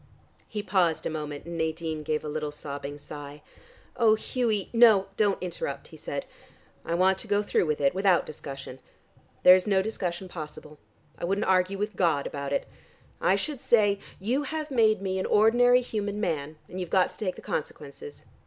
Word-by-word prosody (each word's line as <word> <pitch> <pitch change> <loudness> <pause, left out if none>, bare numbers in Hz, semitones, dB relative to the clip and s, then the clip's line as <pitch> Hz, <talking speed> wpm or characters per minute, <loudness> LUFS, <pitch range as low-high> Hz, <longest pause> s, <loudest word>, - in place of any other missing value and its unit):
He 210 -1 -4
paused 180 -5 +1
a - - -1
moment 150 -2 -5
and 170 -1 -5
Nadine 160 -1 -2
gave 155 0 -2
a - - -3
little 150 0 -3
sobbing 145 -1 -7
sigh. 145 0 -10 0.5
"Oh, 225 -3 +5
Hughie," 230 -1 0
she 195 - -5
began. 230 - -2
"No, 215 -5 +7
don't 205 -3 +1
interrupt," 140 -6 -5
he - - -13
said. 140 -1 -5 0.6
"I 170 - -2
want 190 +2 +3
to 225 - -6
go 205 0 +2
through 190 - +1
with 150 -1 0
it, 140 -1 +3
without 190 -2 +3
discussion. 135 -3 -8 0.6
There 180 - +10
is 185 +2 +3
no 195 -2 +3
discussion 190 -4 -3
possible. 155 -3 -9 0.4
I - - -2
wouldn't 195 +4 0
argue 185 +1 +2
with 210 0 -3
God 165 -7 +2
about 140 -1 -4
it. - - -1 0.5
I 190 - +4
should 270 +6 -3
say: 205 -4 +3 0.2
'You 255 +8 -1 0.2
made 220 -5 +3
me 190 -1 -1
an - - -1
ordinary 245 +4 +5
human 210 -4 -3
man, 155 -6 -2
and 185 - -7
you've 180 -2 -4
got 185 -1 +3
to - - -14
take 190 -4 -2
the - - -12
consequences. 445 -1 -6
185 Hz, 190 wpm, -27 LUFS, 155-210 Hz, 0.6 s, There